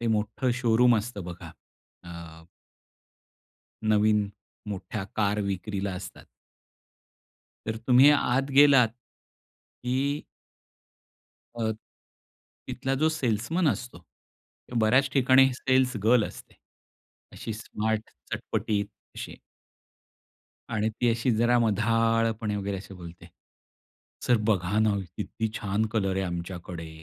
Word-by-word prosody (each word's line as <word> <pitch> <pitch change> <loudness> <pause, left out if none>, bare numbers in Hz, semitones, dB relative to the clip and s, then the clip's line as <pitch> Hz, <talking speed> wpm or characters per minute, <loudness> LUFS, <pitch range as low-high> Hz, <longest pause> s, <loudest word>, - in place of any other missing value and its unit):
ते 120 - -2
मोठं 110 +4 0
शोरूम 120 0 +4
असतं 105 -3 -4
बघा, 85 0 -8 0.5
अ 85 -1 -10 1.5
नवीन 105 -1 +3 0.4
मोठ्या 100 +1 -5
कार 105 0 +1
विक्रीला 100 0 -3
असतात. 90 - -8 1.4
तर 110 - -2
तुम्ही 130 +3 +7
आत 135 -1 +1
गेलात 135 -3 +6 0.9
की 135 +4 -1 1.4
अ, 110 -1 0 1.0
तिथला 135 0 -2
जो 155 +4 +2
सेल्समन 155 - 0
असतो 120 -3 -3
किंवा 115 +6 -11
बऱ्याच 130 +5 +4
ठिकाणी 130 0 +5
सेल्स 130 -1 +1
गर्ल 115 0 +5
असते. - - -10 0.8
अशी 115 - -6
स्मार्ट 110 0 -3 0.2
चटपटीत 105 -2 -1 0.3
अशी. - - -6 1.3
आणि 110 -2 0
ती 120 +2 -1
अशी 120 +2 0
जरा 120 +2 +3
मधाळपणे 115 0 +1
वगैरे, 100 0 -3
अशी 95 +1 -10
बोलते, 85 -1 -11 1.0
"सर 120 - +5
बघा 100 -1 +1
ना, 110 -1 +3 0.2
किती 110 -1 -3
छान 105 +1 -1
कलर 95 -4 0
आहे 95 - 0
आमच्याकडे, 85 -1 -6
110 Hz, 105 wpm, -27 LUFS, 100-125 Hz, 1.5 s, तुम्ही